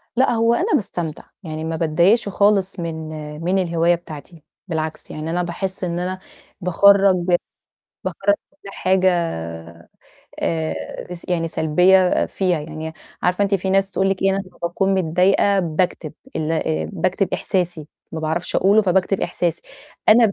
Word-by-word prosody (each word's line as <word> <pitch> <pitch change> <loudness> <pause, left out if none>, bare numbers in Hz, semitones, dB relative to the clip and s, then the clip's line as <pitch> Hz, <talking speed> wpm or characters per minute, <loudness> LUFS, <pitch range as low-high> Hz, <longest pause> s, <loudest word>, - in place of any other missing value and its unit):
لأ، 260 +2 +3
هو 230 0 +3
أنا 385 - 0
باستمتع، 175 -6 -2 0.2
يعني 155 -2 -5
ما 160 0 -2
باتضايقش 170 +8 +3
خالص 200 -1 +2
من 160 -2 -4 0.3
من 185 +3 +1
الهواية 170 -1 +2
بتاعتي، 160 -1 -11 0.2
بالعكس 160 -2 -4
يعني 155 +1 -5
أنا 175 +2 0
باحس 185 +3 -4
إن 175 -1 -1
أنا 185 +1 -3 0.4
باخرّج 195 +2 +5 0.9
باخرّج 305 - +1 0.2
كُلّ 285 -8 -15
حاجة 190 0 +2 1.3
آآ 80 -1 -1 0.4
يس 175 -1 -8
يعني 165 -2 0
سلبية 180 +4 +3
فيها، 180 -4 0
يعني 160 +1 -6 0.3
عارفة 180 +3 +2
أنتِ 200 0 +2
في 190 0 -2
ناس 195 +1 +2
تقول 190 +1 +1
لكِ 195 - -2
إيه، 195 - +4
أنا 195 - 0
لما - - -20
باكون 190 +3 0
متضايقة 190 +3 +3
باكتب، 170 -2 -1 0.2
ال 160 +1 -1
آآ 160 -1 -1
باكتب 185 +2 0
إحساسي، 175 -5 -1 0.2
ما 160 - -4
باعرفش 160 +2 -2
أقوله 205 +3 +5
فباكتب 190 0 +1
إحساسي، 170 -2 -1 0.5
أنا 225 -1 +6
180 Hz, 150 wpm, -21 LUFS, 160-195 Hz, 1.3 s, أنا